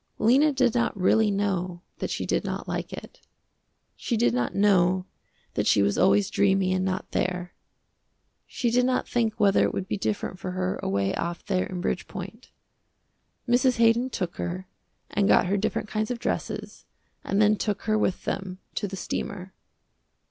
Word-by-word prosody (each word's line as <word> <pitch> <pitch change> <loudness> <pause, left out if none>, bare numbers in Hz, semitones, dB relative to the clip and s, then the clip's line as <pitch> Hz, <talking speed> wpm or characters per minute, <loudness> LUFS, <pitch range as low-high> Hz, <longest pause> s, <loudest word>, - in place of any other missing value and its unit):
Lena 270 +7 +4
did 255 -4 +2
not 235 -4 0
really 215 +3 +4
know 185 -3 -1 0.2
that - - -2
she - - -2
did - - 0
not - - -4
like - - -3
it. - - -10 0.7
She 235 - -2
did 120 - +3
not 120 0 -1
know 185 -2 +3 0.5
that - - 0
she 100 - +4
was 100 0 +1
always 195 +1 +3
dreamy 195 -2 +2
and 185 0 0
not 185 0 -3
there. 180 -1 -2 0.9
She 240 -3 -1
did 250 +1 +3
not 255 0 +1
think 225 -3 0
whether 200 -2 +4
it - - 0
would 190 - -3
be 205 - -2
different 195 -3 -2
for 185 0 -4
her 185 0 -2
away 100 0 0
off 170 0 -4
there 185 -2 0
in 180 -1 -5
Bridgepoint. - - -5 1.0
Mrs. 245 +1 +3
Haydon 230 +2 +4
took 180 -8 -4
her 185 +2 -4 0.4
and 200 -1 +2
got - - +5
her 190 +3 +1
different 205 +1 -1
kinds 215 +1 -2
of 245 - -2
dresses, - - -4 0.4
and 195 - 0
then 210 0 +5
took 205 -1 -2
her 215 - +1
with 200 -3 0
them 190 -1 -3 0.2
to 205 - -2
the 195 0 -6
steamer. 190 0 -5
195 Hz, 175 wpm, -26 LUFS, 185-220 Hz, 1.0 s, got